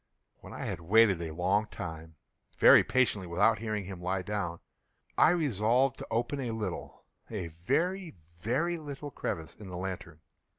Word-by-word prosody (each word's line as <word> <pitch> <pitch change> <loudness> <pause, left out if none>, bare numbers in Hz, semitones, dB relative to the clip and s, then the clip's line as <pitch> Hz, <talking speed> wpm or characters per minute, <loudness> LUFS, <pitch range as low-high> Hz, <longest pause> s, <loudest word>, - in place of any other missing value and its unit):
When - - -12
I - - -6
had - - -3
waited 100 0 +4
a 80 -1 -4
long 95 +6 +1
time, 80 -3 -7 0.4
very - - +8
patiently, 115 -7 +1
without 100 +6 +3
hearing 110 -3 -3
him 95 -1 -8
lie 95 +1 -1
down, 95 -4 -3 0.6
I - - +6
resolved 130 - +2
to - - -7
open 120 +5 -1
a 125 -3 -2
little—a 105 -2 -6
very, 160 - -1 0.2
very 155 - 0
little 145 -1 -7
crevice 80 -10 -4
in 105 - -10
the 90 -1 -6
lantern. 90 -4 -6
105 Hz, 155 wpm, -30 LUFS, 90-125 Hz, 0.6 s, very